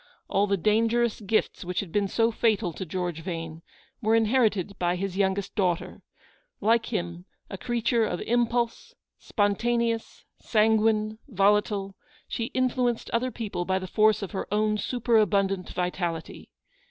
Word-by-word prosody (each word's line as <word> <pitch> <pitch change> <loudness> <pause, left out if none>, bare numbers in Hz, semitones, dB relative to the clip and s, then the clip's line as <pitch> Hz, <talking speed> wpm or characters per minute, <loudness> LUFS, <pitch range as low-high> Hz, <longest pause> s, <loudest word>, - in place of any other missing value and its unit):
All 200 +1 +2
the 200 0 +1
dangerous 225 +4 +2
gifts 210 0 0
which 180 0 -2
had 190 -5 -5
been 205 +1 +1
so 225 +3 +2
fatal 215 -6 +1
to 190 - -6
George 175 -1 -3
Vane, 165 -2 -5 0.4
were 220 0 +3
inherited 215 -4 +2
by 175 0 +1
his 190 0 -3
youngest 195 0 0
daughter. 180 -3 -1 0.6
Like 225 +2 +2
him, 175 -5 -4 0.3
a 195 - -5
creature 235 -1 +1
of 180 -5 -1
impulse, 235 0 0 0.2
spontaneous, 230 +2 0
san 220 0 +3
guine, 215 0 +1
volatile, 200 -2 +1 0.3
she 230 - -2
influenced 250 -1 0
other 240 +2 +1
people 215 -7 -4
by 190 +1 0
the 190 - -4
force 215 +2 +3
of 195 - -5
her 190 - -5
own 210 0 +1
superabundant 205 -6 +1
vitality. 175 -2 -3
210 Hz, 140 wpm, -27 LUFS, 190-230 Hz, 0.6 s, were